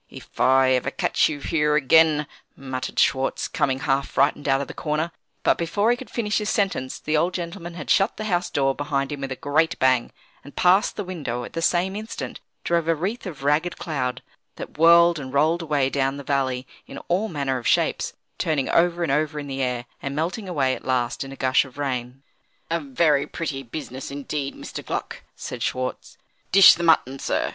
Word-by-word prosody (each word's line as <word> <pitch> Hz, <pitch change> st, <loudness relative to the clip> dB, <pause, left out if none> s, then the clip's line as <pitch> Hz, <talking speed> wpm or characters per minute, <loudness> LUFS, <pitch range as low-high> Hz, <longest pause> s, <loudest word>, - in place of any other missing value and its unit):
"If -, -, -13 dB
I 130 Hz, 0 st, +5 dB
ever 130 Hz, +1 st, +1 dB
catch -, -, +1 dB
you 150 Hz, -2 st, -4 dB
here 150 Hz, -1 st, +1 dB
again," 150 Hz, +1 st, +4 dB, 0.3 s
muttered 130 Hz, -2 st, -5 dB
Schwartz, 135 Hz, 0 st, +1 dB
coming, 135 Hz, -1 st, -1 dB
half 135 Hz, +1 st, +1 dB
frightened, 145 Hz, +1 st, +1 dB
out 135 Hz, 0 st, +3 dB
of 140 Hz, -, -4 dB
the -, -, -8 dB
corner 155 Hz, +2 st, -2 dB, 0.3 s
but -, -, +3 dB
before 205 Hz, +7 st, +1 dB
he -, -, +3 dB
could 255 Hz, +1 st, -10 dB
finish 210 Hz, -3 st, -1 dB
his 210 Hz, 0 st, -2 dB
sentence, 195 Hz, -11 st, -1 dB
the 155 Hz, -, -1 dB
old 175 Hz, +4 st, +1 dB
gentleman 170 Hz, 0 st, -6 dB
had 155 Hz, -4 st, -4 dB
shut 195 Hz, +2 st, +3 dB
the 215 Hz, -, -4 dB
house 180 Hz, -4 st, 0 dB
door 135 Hz, -1 st, +1 dB
behind 140 Hz, -1 st, -2 dB
him 145 Hz, -1 st, -5 dB
with 135 Hz, -1 st, -4 dB
a -, -, -2 dB
great 155 Hz, +5 st, +1 dB
bang; 130 Hz, -2 st, +2 dB, 0.3 s
and 145 Hz, -, -13 dB
past 190 Hz, +5 st, +3 dB
the 205 Hz, -, -3 dB
window, 145 Hz, -10 st, -4 dB
at -, -, -9 dB
the 165 Hz, -, -3 dB
same 180 Hz, +3 st, +1 dB
instant, 215 Hz, +2 st, -6 dB, 0.2 s
drove 170 Hz, -1 st, 0 dB
a 165 Hz, -, +3 dB
wreath 195 Hz, +8 st, -3 dB
of 150 Hz, -6 st, -8 dB
ragged 150 Hz, +5 st, +1 dB
cloud, 130 Hz, -5 st, -3 dB, 0.3 s
that -, -, -8 dB
whirled 170 Hz, +1 st, +6 dB
and 130 Hz, -2 st, -7 dB
rolled 160 Hz, +4 st, +3 dB
away 150 Hz, -4 st, +1 dB
down 135 Hz, 0 st, 0 dB
the 140 Hz, -, -7 dB
valley 130 Hz, -2 st, -1 dB, 0.2 s
in -, -, -9 dB
all 190 Hz, +6 st, +1 dB
manner 140 Hz, -5 st, -1 dB
of 120 Hz, -, -4 dB
shapes; -, -, +1 dB, 0.3 s
turning 150 Hz, -4 st, 0 dB
over 170 Hz, 0 st, +2 dB
and 165 Hz, -, 0 dB
over 150 Hz, +1 st, 0 dB
in 145 Hz, -, -6 dB
the 135 Hz, -1 st, -4 dB
air, 125 Hz, -2 st, -1 dB, 0.2 s
and 140 Hz, 0 st, -4 dB
melting 185 Hz, +6 st, -2 dB
away 135 Hz, -6 st, +1 dB
at -, -, -7 dB
last 125 Hz, -1 st, -1 dB
in 135 Hz, -, -9 dB
a -, -, -8 dB
gush 130 Hz, -1 st, +3 dB
of 135 Hz, -1 st, -14 dB
rain. 130 Hz, -2 st, -4 dB, 0.5 s
"A 170 Hz, -, +1 dB
very 145 Hz, 0 st, +1 dB
pretty 150 Hz, -5 st, -4 dB
business, 130 Hz, 0 st, -7 dB
indeed, 140 Hz, 0 st, -4 dB
Mr. -, -, -8 dB
Gluck!" -, -, -5 dB
said -, -, -7 dB
Schwartz. 130 Hz, 0 st, -3 dB, 0.3 s
"Dish 195 Hz, 0 st, +9 dB
the 175 Hz, -, -5 dB
mutton, 150 Hz, -5 st, +3 dB
sir. -, -, -1 dB
145 Hz, 205 wpm, -23 LUFS, 135-170 Hz, 0.5 s, Dish